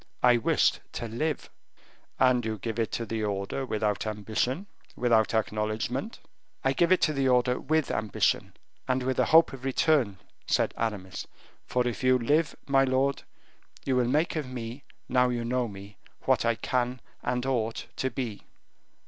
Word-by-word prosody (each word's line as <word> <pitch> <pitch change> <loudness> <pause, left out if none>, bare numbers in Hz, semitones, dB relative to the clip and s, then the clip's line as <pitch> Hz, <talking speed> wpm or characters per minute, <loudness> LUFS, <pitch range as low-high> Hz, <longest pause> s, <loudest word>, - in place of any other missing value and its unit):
"I 125 -1 +6
wished 115 - +2
to 115 - -4
live." 150 +8 -3 0.7
"And 130 -2 +4
you 110 -1 -2
give 115 +3 -4
it 115 - 0
to 115 - -2
the 110 0 -3
order 100 +6 -2
without 105 -2 -1
ambition, 110 - -1 0.3
without 115 -3 +2
acknowledgement?" 110 - -2 0.4
"I 135 - +2
give 170 +5 +2
it 185 - +5
to 155 - +3
the 135 -2 +1
order 125 0 +3
with 155 +1 0
ambition 105 -3 0 0.3
and 130 0 +1
with 130 0 -1
a - - +4
hope 165 -2 +6
of 130 -1 -9
return," 135 -6 +2 0.3
said - - +2
Aramis; 100 -5 -3 0.4
"for 125 -1 +1
if 120 +1 -3
you 130 0 +5
live, 145 +6 +1
my 135 -1 +4
lord, 135 +1 +1 0.6
you 135 - +1
will 125 -1 +2
make 150 +7 +1
of 150 -5 -3
me, 125 +1 -6 0.2
now 125 0 +3
you 120 -1 -2
know 125 0 0
me, 100 -1 -11 0.3
what - - +2
I 115 0 +3
can 125 +2 -1 0.2
and 125 +1 -1
ought 115 -4 -1
to 130 - 0
be." 115 -5 -5
125 Hz, 165 wpm, -28 LUFS, 110-135 Hz, 0.7 s, I